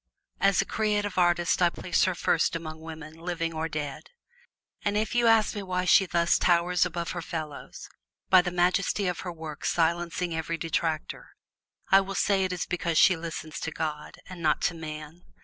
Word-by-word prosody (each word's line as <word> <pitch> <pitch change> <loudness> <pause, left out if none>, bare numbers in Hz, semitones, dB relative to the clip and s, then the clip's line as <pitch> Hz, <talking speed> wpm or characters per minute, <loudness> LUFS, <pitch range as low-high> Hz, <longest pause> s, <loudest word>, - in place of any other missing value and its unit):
As 195 -1 +3
a - - -15
Creative 210 -2 -1
Artist 175 0 +2
I 175 - +5
place 170 0 0
her 185 - 0
first 165 0 +1
among 160 -1 -6
women, 160 -1 -9
living 165 0 -3
or 160 +1 -3
dead. 150 -3 -5 0.7
And 205 0 0
if 215 +1 -1
you 240 -1 +3
ask 225 -2 +4
me 205 - -3
why 185 -1 -2
she 190 +1 +5
thus 170 -1 +2
towers 180 +1 +3
above 170 -1 -4
her 175 - -4
fellows, 155 -4 -7 0.4
by 185 -1 +7
the 180 - -2
majesty 180 +3 +1
of 180 -2 -1
her 180 - -5
work 160 -3 -8
silencing 170 +1 0
every 160 +1 -3
detractor, 165 -1 -3 0.6
I 195 - +7
will 195 0 -6
say 195 0 +2
it 185 - -1
is 180 -1 -2
because 170 -2 -1
she 185 - +6
listens 160 -2 -6
to - - -3
God, 155 -2 -5
and 185 -2 -9
not 155 -2 +1
to - - +2
man. 155 0 -8
170 Hz, 185 wpm, -27 LUFS, 160-185 Hz, 0.7 s, by